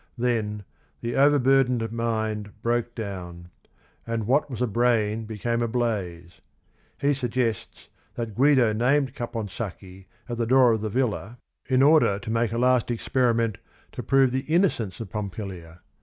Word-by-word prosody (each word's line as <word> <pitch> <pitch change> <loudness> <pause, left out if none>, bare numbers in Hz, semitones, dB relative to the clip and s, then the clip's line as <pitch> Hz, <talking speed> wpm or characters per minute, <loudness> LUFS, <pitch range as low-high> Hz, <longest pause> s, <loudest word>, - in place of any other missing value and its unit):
Then 110 -4 -1 0.4
"the 120 +1 -3
overburdened 135 -4 +3
mind 110 -3 -3
broke 120 0 -1
down," 90 -5 -7 0.6
and 115 -2 -2
"what 140 +6 +2
was 120 -5 -6
a 125 - +2
brain 115 -1 +1
became 115 +2 -2
a 120 - +1
blaze." 100 -8 -3 0.6
He 145 +1 +1
suggests 125 -3 -3 0.3
that 115 -3 -4
Guido 130 -2 +4
named 130 +4 +1
Caponsacchi 105 -6 -6 0.2
at 120 -1 -5
the 115 - 0
door 130 -1 +5
of 110 -2 0
the 110 - -2
villa 120 -1 -2 0.3
in 130 0 +3
order 150 -9 +5
to 105 +2 -6
make 115 0 +1
a 115 - -2
last 125 -1 +2
experiment 115 -2 0 0.3
to - - -6
prove 135 -1 +3
the 130 +3 -3
innocence 155 - +1
of 110 -5 -7
Pompilia. 95 -5 -6
115 Hz, 145 wpm, -25 LUFS, 105-125 Hz, 0.6 s, door